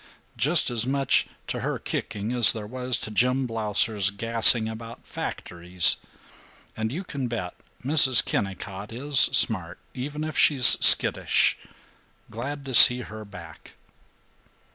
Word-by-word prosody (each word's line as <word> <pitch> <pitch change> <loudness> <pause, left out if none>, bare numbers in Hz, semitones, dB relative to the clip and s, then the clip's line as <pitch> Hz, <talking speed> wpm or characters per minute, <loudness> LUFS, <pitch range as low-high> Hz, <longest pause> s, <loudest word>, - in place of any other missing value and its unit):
Just 140 +5 +2
as 120 0 +1
much 135 0 -2 0.2
to - - -7
her - - -6
kicking 110 +1 -7
as 120 -3 +5
there 110 -2 -10
was 125 +2 -4
to 110 - -8
Jim 125 +4 -2
Blausser's 105 -3 -2
gassing 115 +2 +2
about 115 +1 -12
factories. 90 0 -1 0.8
And 110 0 -6
you 175 +8 -8
can 140 -8 -8
bet 110 -7 -8 0.3
Mrs. 135 -4 +4
Kennicott 100 +1 -7
is 135 +4 -2
smart, 100 -10 +2 0.2
even 145 +4 -8
if 155 0 -8
she 150 - +1
is 125 -3 +7
skittish. - - +3 0.8
Glad 140 +5 -9
to 135 - -9
see 125 +1 +7
her 110 -2 -12
back." 90 -6 -16
115 Hz, 135 wpm, -22 LUFS, 105-130 Hz, 0.8 s, is